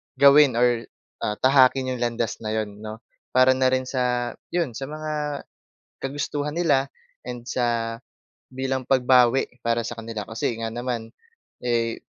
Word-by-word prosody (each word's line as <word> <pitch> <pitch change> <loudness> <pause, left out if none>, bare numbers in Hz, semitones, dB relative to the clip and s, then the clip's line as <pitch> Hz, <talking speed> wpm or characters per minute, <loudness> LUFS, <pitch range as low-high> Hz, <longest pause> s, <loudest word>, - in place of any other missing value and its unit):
gawin 140 -1 +7
or, 120 -1 +2 0.3
ah, 105 - -1
tahakin 130 -1 +5
'yong 125 - -3
landas 120 -1 -1
na 110 -1 -3
'yon 105 -1 -3
'no. 110 +1 -8 0.3
Para 130 +1 +5
na 130 0 +2
rin 130 0 +1
sa 125 -2 -1 0.2
'yon, 170 -9 0
sa 135 +4 -6
mga 150 -1 -4 0.6
kagustuhan 145 +1 -2
nila 145 -5 +2 0.3
and 120 -1 -7
sa 115 -2 -1 0.5
bilang 130 0 -3
pagbawi 130 -1 +4 0.2
para 115 0 0
sa 120 -1 -6
kanila 110 -2 -5
kasi 115 +1 -2
nga 115 0 -3
naman, 120 -2 -4 0.5
eh, 115 -2 -1
125 Hz, 145 wpm, -24 LUFS, 115-135 Hz, 0.6 s, gawin